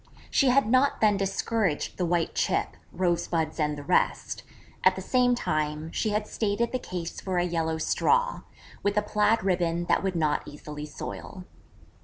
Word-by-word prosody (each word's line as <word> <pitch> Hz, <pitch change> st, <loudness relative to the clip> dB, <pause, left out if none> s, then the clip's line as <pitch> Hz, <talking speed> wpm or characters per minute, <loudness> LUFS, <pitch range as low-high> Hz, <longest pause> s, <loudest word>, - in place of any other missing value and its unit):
She 275 Hz, -, +4 dB
had 270 Hz, 0 st, +4 dB
not 260 Hz, +4 st, +3 dB
then 210 Hz, -2 st, +4 dB
discouraged 195 Hz, -2 st, -1 dB
the 180 Hz, -, 0 dB
white 170 Hz, -1 st, 0 dB
chip, -, -, +1 dB, 0.2 s
rosebuds 170 Hz, -3 st, 0 dB
and 150 Hz, -1 st, 0 dB
the 145 Hz, -, -7 dB
rest; 180 Hz, +5 st, +1 dB, 0.4 s
at -, -, +5 dB
the -, -, -5 dB
same 250 Hz, -1 st, +3 dB
time, 155 Hz, -5 st, -2 dB
she 215 Hz, -, -1 dB
had 210 Hz, 0 st, 0 dB
stated 220 Hz, +2 st, -1 dB
the 255 Hz, -, -1 dB
case 175 Hz, -6 st, -5 dB
for 185 Hz, -2 st, -2 dB
a 175 Hz, -, +3 dB
yellow 165 Hz, -2 st, -1 dB
straw, 485 Hz, -, +1 dB, 0.4 s
with 205 Hz, +1 st, 0 dB
a 210 Hz, -, +3 dB
plaid 210 Hz, +1 st, +2 dB
ribbon 175 Hz, -2 st, +1 dB
that -, -, +2 dB
would 190 Hz, -2 st, -1 dB
not 155 Hz, -3 st, +1 dB
easily 150 Hz, 0 st, -8 dB
soil. 180 Hz, +4 st, -7 dB
180 Hz, 170 wpm, -27 LUFS, 160-215 Hz, 0.4 s, at